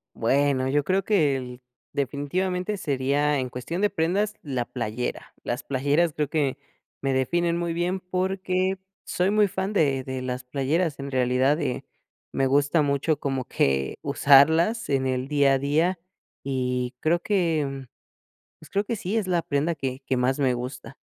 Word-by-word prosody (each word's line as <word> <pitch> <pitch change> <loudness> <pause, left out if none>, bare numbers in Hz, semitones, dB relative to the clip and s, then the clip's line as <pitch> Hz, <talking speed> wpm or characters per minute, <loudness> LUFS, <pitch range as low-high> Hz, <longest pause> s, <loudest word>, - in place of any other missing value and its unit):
Bueno, 130 +2 +2
yo 145 +2 +2
creo 190 +6 0
que, 155 -10 +3
el 125 -1 -7 0.3
definitivamente 180 +8 -1
sería, 140 0 +1
en 130 -1 -2
cuestión 130 +9 -5
de 210 - +3
prendas, 200 +4 0
la 130 -5 -2
playera, 120 -1 -4
las 120 +3 -2
playeras 145 +5 +1
creo 150 -2 -1
que 145 -4 0 0.4
me 135 -1 0
definen 170 +6 +1
muy 170 -1 -1
bien 180 +2 -1
porque 185 +1 -1 0.3
soy 180 +2 +1
muy 210 0 +4
fan 190 +2 -3
de 140 -9 +2
de 130 0 -5
las 125 0 -3
playeras 145 +5 -1
en 140 0 -5
realidad, 130 +4 +2
eh, 125 - -2 0.5
me 135 - +1
gusta 145 +3 +3
mucho 140 +1 +1
como 135 -2 -2
que 70 - 0
usarlas 160 +11 +4
en 135 -2 +1
el 130 0 -1
día 140 -2 +4
a - - +2
día 160 +6 +1 0.4
y 125 -2 -2
creo 170 +2 +2
que, 155 -9 0 0.7
pues 155 - -14
creo 200 +1 0
que 230 - -2
sí, 200 +2 -3
es 215 - 0
la 180 -2 +2
prenda 150 +4 0
que 135 -3 -4
que 130 - 0
más 130 +3 +1
me 130 -3 +2
gusta. 125 +2 -6
145 Hz, 165 wpm, -25 LUFS, 130-175 Hz, 0.7 s, muy